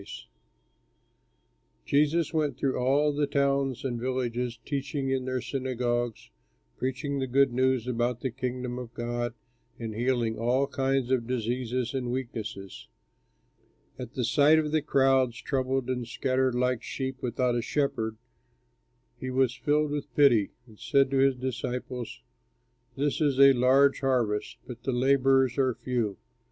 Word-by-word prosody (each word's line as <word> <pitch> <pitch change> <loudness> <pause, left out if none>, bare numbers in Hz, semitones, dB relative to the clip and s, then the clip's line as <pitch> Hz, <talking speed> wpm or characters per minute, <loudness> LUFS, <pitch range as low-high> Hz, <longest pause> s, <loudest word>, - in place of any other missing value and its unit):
Slade] - - -10 1.6
Jesus 150 +4 +2
went 150 -5 0
through 135 -1 0
all 140 +4 +2
the 145 0 0
towns 140 -2 0
and 120 -3 -2
villages, 125 -2 -2
teaching 140 -1 -2
in 130 -1 -1
their 130 -1 -2
synagogues, 120 -2 -2 0.4
preaching 135 +2 -3
the 130 - -1
good 135 0 +3
news 130 -1 +1
about 120 -1 -1
the 130 - -2
Kingdom 125 0 -4
of 120 -2 -9
God, 120 0 -3 0.4
and 115 -2 -5
healing 120 -1 0
all 125 +4 +2
kinds 135 -2 -1
of 120 -3 +1
diseases 125 0 -2
and 130 -2 -2
weaknesses. 110 -6 -6 1.1
At 125 +2 -8
sight 140 +5 +4
of 155 -1 0
the 155 0 +2
crowds, 135 -4 +2
troubled 130 0 -1
and 125 -2 -2
scattered 130 +1 0
like 125 -1 +1
sheep 130 -1 -5
without 125 0 0
a 120 - 0
shepherd, 115 -5 -1 1.0
he 130 - -4
was 130 -1 +2
filled 150 +2 +1
with 145 -1 -4
pity, 120 -8 +5 0.2
and 110 -4 -18
said 135 -1 +2
to 135 - +1
his 135 0 +4
disciples, 125 - -5 0.7
"This 145 +2 0
is 140 -3 +2
a 140 0 +8
large 135 +3 +4
harvest, 120 -6 0
but 120 -2 -9
the 130 +2 -2
laborers 135 0 +3
are 130 -3 +2
few. 120 -6 -2
130 Hz, 145 wpm, -28 LUFS, 120-135 Hz, 1.6 s, a